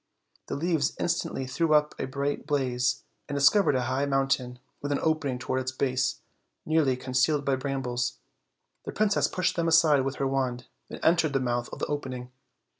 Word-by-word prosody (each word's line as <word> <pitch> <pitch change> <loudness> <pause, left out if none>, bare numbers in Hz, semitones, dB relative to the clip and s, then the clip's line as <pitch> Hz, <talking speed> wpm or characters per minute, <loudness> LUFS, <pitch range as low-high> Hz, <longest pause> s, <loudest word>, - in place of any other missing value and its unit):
The - - -3
leaves 160 -1 0
in - - -2
stantly 135 -5 -2
threw 155 +4 +2
up 150 0 +3
a - - -2
bright 140 +2 -3
blaze, 125 -4 0 0.3
and 145 - -3
discovered 140 +3 +4
a 130 - +1
high 130 +3 0
mountain, 135 -2 0 0.2
with 145 - -3
an 140 - +2
opening 155 -5 0
toward 130 +1 -2
its 130 0 -3
base, 130 0 -1 0.4
nearly 155 -5 +2
con 130 0 -7
cealed 140 +3 +2
by 135 - +2
brambles; 130 -2 -2 0.7
the - - -5
princess 210 -1 +2
pushed 180 -1 -1
them 170 -1 0
aside 160 -4 +5
with 135 +1 -2
her 135 - -1
wand, 130 -2 -1 0.2
and - - -8
entered 165 -3 +3
the 135 - +2
mouth 120 -1 -1
of - - -7
the - - -2
opening. 130 -4 -5
135 Hz, 190 wpm, -27 LUFS, 130-150 Hz, 0.7 s, aside